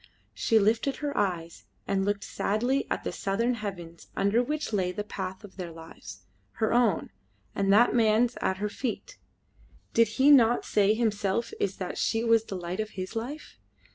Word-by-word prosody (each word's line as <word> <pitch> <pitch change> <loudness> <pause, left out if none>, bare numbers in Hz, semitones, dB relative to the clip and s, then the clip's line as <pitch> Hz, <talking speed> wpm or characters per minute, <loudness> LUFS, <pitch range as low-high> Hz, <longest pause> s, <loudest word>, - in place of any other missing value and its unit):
She 225 - +2
lifted 225 +6 +2
her 290 -1 -4
eyes 170 - -2 0.2
and 195 -1 +1
looked 205 0 -1
sadly 245 +7 -1
at - - -2
the - - -3
southern 230 +5 0
heavens 180 -7 -7
under 200 +4 +3
which 300 0 -3
lay 185 -3 +1
the 205 +3 -4
path 190 -1 -6
of 200 -2 -13
their 175 -3 -5
lives 100 - -11 0.3
her 220 0 0
own, 240 -1 +2 0.4
and 195 0 +1
that 220 +4 +5
man's 230 +1 +3
at 190 - 0
her 210 +2 -2
feet. 255 - -5 0.7
Did 230 0 +5
he 275 +2 +6
not 240 -4 +5
say 210 0 +3
himself 220 0 -1
is 195 -1 -1
that 185 -2 -5
she 225 0 +1
was 230 -1 +3
the 195 - -6
light 180 +1 -5
of 215 0 -2
his 185 +4 -5
life? 255 +7 -6
210 Hz, 175 wpm, -28 LUFS, 190-235 Hz, 0.7 s, he